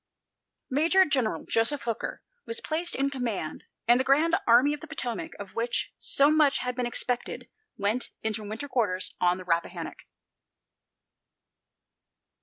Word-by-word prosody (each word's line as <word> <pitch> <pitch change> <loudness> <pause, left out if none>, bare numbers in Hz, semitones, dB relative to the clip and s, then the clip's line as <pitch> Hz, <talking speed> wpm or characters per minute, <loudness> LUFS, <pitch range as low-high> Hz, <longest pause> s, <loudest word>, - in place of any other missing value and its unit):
Major 335 +7 +4
General 260 -8 0
Joseph 230 +4 +1
Hooker 230 -2 -4 0.2
was 465 0 -3
placed 340 -4 -1
in 275 +1 0
command, 235 - -4 0.2
and 240 +1 +6
the - - +2
Grand 305 +5 +4
Army 250 +5 +6
of 295 - -5
the 325 - -8
Potomac, 250 -7 -4
of 200 -2 -9
which 235 +1 -1
so 285 +2 +4
much 305 -2 +4
had 250 0 -3
been 250 -1 -1
expected, 240 +1 -1 0.3
went 210 +5 0
into 220 -1 -2
winter 215 +7 -5
quarters 210 -9 -1
on 180 0 +3
the 185 - -8
Rappahannock. 170 -2 -2
250 Hz, 140 wpm, -27 LUFS, 220-290 Hz, 0.3 s, and